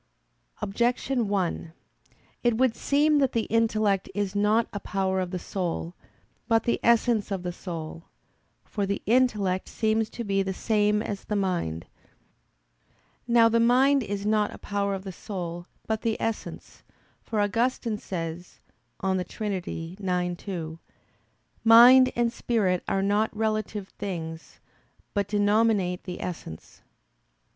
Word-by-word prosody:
Objection 240 +3 0
1: 180 -4 -2 0.7
It 240 -2 +2
would 255 -2 +2
seem 295 +1 +3
that 270 -2 +2
the 230 - +1
intellect 215 -4 +2
is 205 -1 -2
not 210 +3 +3
a 205 - -3
power 190 -1 -1
of 185 -1 -2
the 185 - -3
soul, 175 -2 -3 0.5
but 225 -1 +3
the 235 - 0
essence 235 -2 +3
of 195 -3 -3
the 180 - -2
soul. 165 -2 -7 0.6
For 200 -2 -2
the 200 - -2
intellect 210 -6 +2
seems 220 0 0
to 235 - -6
be 195 -2 +1
the 190 -1 -2
same 210 0 +1
as 200 -2 -5
the 210 - -2
mind. 175 - -1 1.4
Now 235 -1 +6
the 230 +1 +2
mind 260 +4 +4
is 205 -2 -4
not 210 -1 +2
a - - -9
power 200 -1 -2
of 190 - -7
the 195 - -6
soul, 175 -2 -6 0.2
but 220 -1 -2
the 225 -1 -1
essence; 225 -1 -5 0.4
for 220 - -3
Augustine 230 +1 0
says 170 -2 -6 0.4
(De 190 -1 +1
Trin. 210 +2 -4
ix, 180 0 -3
2): 165 -5 -5 0.8
"Mind 245 +3 +8
and 235 -1 +1
spirit 195 -7 0
are 195 - +1
not 210 +2 +1
relative 215 -2 -2
things, 165 -5 -6 0.5
but 200 -2 0
denominate 205 -3 +2
the 180 -2 -6
essence." 160 - -7
205 Hz, 135 wpm, -26 LUFS, 185-225 Hz, 1.4 s, Mind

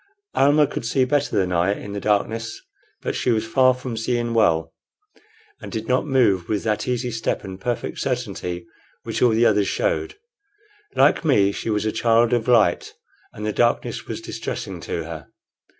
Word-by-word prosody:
Almah 145 +2 +4
could 130 - -5
see 130 +3 +1
better 145 +2 0
than 95 -2 +1
I 90 +3 +2
in 100 - -8
the 100 - -3
darkness; 110 +3 -1 0.4
but - - -1
she - - -1
was 110 -2 +1
far 130 +2 +4
from 125 -2 -6
seeing 120 +1 -1
well, 80 -7 +2 0.9
and - - -8
did 110 -1 -4
not 130 +4 +1
move 110 -10 +2
with 105 -2 -1
that 110 -2 -1
easy 125 0 -1
step 115 0 -2
and 95 0 -8
perfect 120 +2 -3
certainty 90 -1 -3 0.4
which - - -4
all 125 - +6
the 115 +1 +3
others 105 -3 +3
showed. - - -1 0.8
Like - - +4
me, 105 -11 +3
she 105 - -5
was 105 -1 0
a 110 - +1
child 115 +1 +3
of 120 -1 0
light, 110 -8 +3 0.4
and 105 - -7
the 105 - -1
darkness 120 +2 0
was - - -5
distressing - - -5
to 85 - -4
her. 80 -4 -8
115 Hz, 180 wpm, -22 LUFS, 100-125 Hz, 0.9 s, all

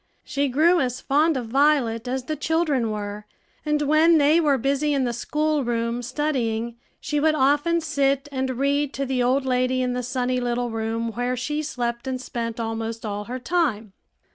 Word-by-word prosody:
She 285 -1 -1
grew 320 +7 +3
as 250 -2 -1
fond 300 +2 +2
of 240 -3 -5
Violet 260 -4 +2
as 260 +1 -2
the 310 +4 -3
children 300 -5 0
were; 210 0 -5 0.4
and 300 -1 0
when 310 +3 +5
they 305 +3 +4
were 290 -4 +3
busy 280 +3 0
in 270 - +1
the 240 -1 -1
school 300 +4 0
room, 235 0 -1
studying, 240 -4 -2 0.2
she 295 0 -1
would 310 +1 +3
often 295 +5 +2
sit 280 -3 0
and 265 -1 -2
read 280 +1 0
to 275 - -2
the 260 -1 -1
old 260 +2 +2
lady 255 0 +1
in 250 0 -1
the 250 - -2
sunny 250 0 -1
little 245 -1 -1
room 225 +1 -2
where 245 +2 -2
she 295 +5 -2
slept 240 -4 -3
and 260 -1 -2
spent 235 -2 -4
almost 225 0 -4
all 205 0 -4
her 250 +3 -5
time. 245 - -1
260 Hz, 185 wpm, -24 LUFS, 235-295 Hz, 0.4 s, when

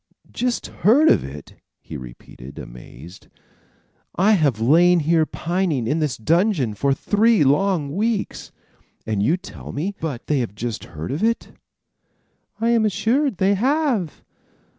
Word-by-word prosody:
"Just 245 0 -2
heard 275 - +3
of - - +3
it!" 70 +2 -10 0.2
he - - -10
repeated, 65 +1 -11
amazed. 65 +8 -12 0.9
"I 195 +5 +3
have 150 - +2
lain 170 +8 +4
here 160 +1 +2
pining 170 -8 -1
in 145 +8 0
this 150 -5 -1
dungeon 165 - +1
for 140 +7 0
three 210 +6 +2
long 150 0 +1
weeks, 215 +1 -2 0.5
and 105 -2 -1
you 150 - +2
tell - - -10
me 175 +8 -3 0.3
they 150 -2 0
have 120 - -2
but 100 - -25
just 115 +1 -5
heard 80 -1 -7
of 150 +9 -3
it." 230 +1 0 1.1
"I 230 +1 +1
am 230 -2 +3
assured 230 +4 0
they 195 +2 +2
have." 250 - 0
165 Hz, 140 wpm, -21 LUFS, -, 1.1 s, lain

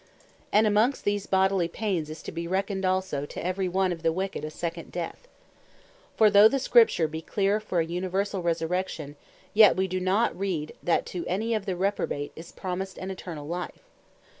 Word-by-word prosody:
And 215 +2 +5
amongst 215 +6 +2
these 205 -1 -1
bodily 190 -2 +2
paines, 175 -4 -2
is 155 - -8
to - - -6
be 170 0 -4
reckoned 190 +1 -1
also 185 -6 0
to - - -7
every 185 +1 -1
one 190 +1 +1
of 170 -2 -5
the 165 0 +2
wicked 190 +2 -3
a 155 - -3
second 170 +1 -5
Death. 175 - -5 0.9
For 215 -2 +6
though 205 +2 +9
the 275 - 0
Scripture 275 - +4
bee 160 +1 -6
clear 200 +4 +1
for 185 -5 -1
an 165 - -3
universall 190 +2 -1
Resurrection; 165 -3 -2 0.4
yet 210 -1 +7
wee 190 0 +1
do 185 0 -2
not 190 +5 +1
read, 180 -6 -3
that 170 - +1
to 175 -2 -3
any 220 +6 -1
of 215 -2 -2
the 185 - -1
Reprobate 180 -6 -1
is 165 +1 -10
promised 190 +1 -5
an 190 +1 -5
Eternall 165 -6 -7
life. 175 - -5
185 Hz, 190 wpm, -27 LUFS, 170-200 Hz, 0.9 s, though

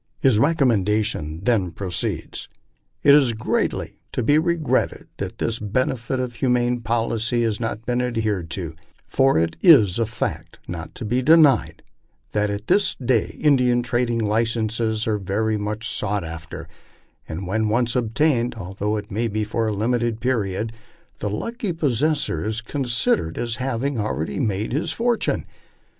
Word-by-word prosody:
His 120 -5 +4
recommendation 110 - +1
then 110 -6 +2
proceeds: 90 -1 -2 0.3
'' - - -46
It 140 - +7
is 135 -5 +5
greatly 110 - -2
to 125 - -1
be 145 +6 +4
regretted 165 -2 0
that - - -5
this 115 0 -1
bene 110 +5 0
ficent 130 +1 -3
and 125 -1 -5
humane 125 -1 +1
policy 115 0 0
had 110 -2 0
not 115 -1 -3
been 125 0 0
adhered 110 -8 -1
to, 85 -2 -4 0.3
for 135 0 +3
it 80 0 0
is 115 - +6
a 115 - +1
fact 120 - -4
not - - -6
to - - -6
be 120 +4 +1
de 155 +6 +6
nied, 120 - +3 0.5
that 105 0 +1
at 100 +1 -4
this 205 - +2
day 125 -3 0
Indian 125 -5 +3
trading 120 -1 0
licenses 110 0 0
are 105 -2 0
very 105 +3 0
much 105 +2 -3
sought 105 -2 -1
after, 80 0 -7 0.6
and 85 +5 -5
when 110 +4 0
once 120 +2 +1
obtained, 125 +1 +1
although 100 +1 -3
it 105 0 -7
may 115 +4 0
be 110 0 -1
for 110 +2 -1
a - - 0
limited 115 +1 0
period, 110 -3 -1 0.5
the 105 - -2
lucky 215 - -3
posses 150 -1 +1
sor 80 - -2
is 110 +1 -2
considered 115 - 0
as 115 -1 -2
haying 130 0 -2
already 105 - -2
made 110 -3 -1
his 150 - 0
fortune. 235 0 0
115 Hz, 160 wpm, -22 LUFS, 105-125 Hz, 0.6 s, It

